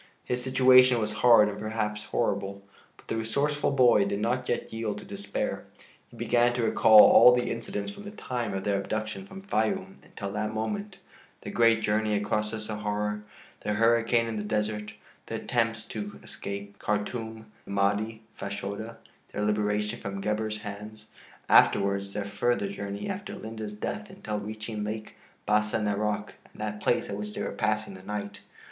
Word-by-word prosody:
His 125 0 -2
situation 130 -1 +6
was 105 -1 -2
hard 115 -3 +7
and 105 0 -5
perhaps 105 -1 -3
horrible, 100 -3 -1 0.3
but - - -20
the - - -2
resourceful 140 +7 0
boy 125 -6 +5
did 100 0 -2
not 125 +4 -1
yet 120 - -2
yield 110 -2 -2
to - - -9
despair. 100 0 -4 0.4
He - - -16
began 120 0 +3
to 120 -1 -1
recall 110 -1 +8
all 125 - +8
the 125 - 0
incidents, 115 - -4
from 205 0 -11
the - - -5
time 125 - -4
of 95 - -3
their 100 -1 +1
abduction 110 -2 -4
from 195 - -10
Fayûm 110 - -1
until 100 -1 -7
that 110 +1 -2
moment: 200 - -3 0.4
the - - -6
great 115 -1 +4
journey 105 0 +1
across 105 +1 0
the 110 0 -4
Sahara, 105 -1 -2 0.4
the 105 - -2
hurricane 115 +1 +3
in 115 -1 -3
the 105 - -2
desert, 105 0 -2 0.3
the - - -4
attempts 115 -2 -1
to 105 -2 -6
escape, 100 0 -7
Khartûm, 110 +1 -3 0.2
the - - -14
Mahdi, 105 +3 0
Fashoda, 100 +3 -5 0.3
their 105 - -2
liberation 105 +1 0
from 100 -2 -5
Gebhr's 105 +1 -2
hands; 105 +1 -8 0.4
afterwards 100 0 +4
the 105 - -3
further 100 +1 0
journey 100 0 -5
after 200 0 -5
Linde's 110 -1 -6
death 210 - -4
until 110 - -4
reaching 110 +1 -5
Lake 110 +1 -5 0.3
Bassa 105 +1 +2
Narok 105 0 -1 0.2
and - - -18
that 105 0 -4
place 120 - +1
at 100 - -4
which 105 0 -6
they - - -3
were - - -3
passing 110 -1 -1
the 95 - -11
night. 100 +1 -5
105 Hz, 170 wpm, -28 LUFS, 105-115 Hz, 0.4 s, recall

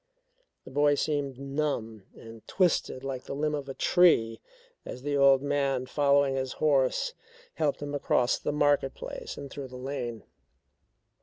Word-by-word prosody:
The - - -11
boy 145 +1 +3
seemed 140 -3 -2
numb 135 -7 -3
and 115 0 -12
twisted 175 -7 +1
like 135 -2 -5
the - - -5
limb 150 +1 -1
of 140 -2 -4
a 135 - -6
tree 115 -11 +3 0.4
as 125 - -8
the 145 0 -1
old 140 -1 +5
man 140 -3 0
following 140 0 +2
his 130 -1 -2
horse 145 - +1 0.4
helped 145 -2 -1
him 145 0 -5
across 125 -3 +1
the - - -2
market 145 -2 +2
place - - -7
and 140 - -7
through 140 -2 -6
the 125 0 -10
lane. 125 -4 -5
140 Hz, 155 wpm, -28 LUFS, 130-145 Hz, 0.4 s, old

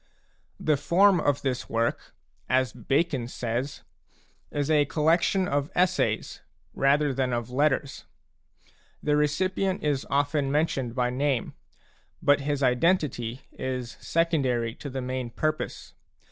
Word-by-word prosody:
The 150 -2 +2
form 185 +5 +4
of 145 -2 0
this 130 -2 -2
work, 115 +1 -1 0.3
as 130 -2 +2
Bacon 140 -4 0
says, 120 +3 -3 0.7
is 145 +1 -1
a 150 -2 +4
col 150 +2 -3
lection 170 +4 +3
of 145 -1 -1
essays 180 +1 +1 0.3
rather 140 +1 +2
than 130 -1 0
of 120 0 -3
letters. 140 +1 0 1.0
The 150 -1 +2
recipient 185 +6 0
is 145 -3 0
often 145 0 +1
mentioned 135 -5 0
by 125 -1 +1
name; 135 -1 -1 0.7
but 145 0 +3
his 145 0 -1
identity 130 -3 +1
is 125 -2 -4
secondary 135 -9 0
to 140 - -8
the 130 0 -4
main 130 -1 -3
purpose. 155 +6 -3
140 Hz, 125 wpm, -27 LUFS, 125-155 Hz, 1.0 s, form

